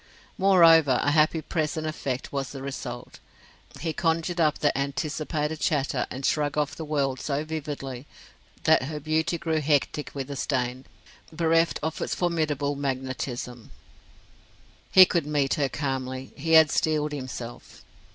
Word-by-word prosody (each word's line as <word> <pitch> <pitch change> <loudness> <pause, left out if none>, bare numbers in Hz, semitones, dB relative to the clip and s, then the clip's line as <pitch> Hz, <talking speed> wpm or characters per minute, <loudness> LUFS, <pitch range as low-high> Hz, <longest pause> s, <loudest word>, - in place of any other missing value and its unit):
Moreover, 165 -8 +6
a 145 - +2
happy 155 +1 +3
present 155 -1 -2
effect 135 -4 -4
was 135 -2 -2
the 135 -1 -7
result. 130 -3 -7 0.6
He 160 -1 -2
conjured 165 +1 0
up 155 -2 +3
the 145 - +1
anticipated 150 +2 -2
chatter 140 -5 0
and 130 +1 -5
shrug 150 -1 0
of 150 -1 0
the 160 - -6
world 140 -4 -1
so 145 +2 -2
vividly 145 -4 -5 0.6
that - - +5
her 150 +1 -5
beauty 160 +3 0
grew 160 -1 -1
hectic 150 0 0
with 135 -1 -3
the 140 - -4
stain, 130 -1 -2 0.5
bereft 165 0 +2
of 160 0 -3
its - - -2
formidable 155 -5 0
magnetism. 130 -3 -4 1.2
He 185 -1 +10
could 170 -4 -1
meet 145 -2 +1
her 145 -4 0
calmly; 130 -2 -4
he 160 +3 -1
had 160 -1 +7
steeled 150 -1 +1
himself. 130 -4 -7
150 Hz, 140 wpm, -26 LUFS, 135-160 Hz, 1.2 s, He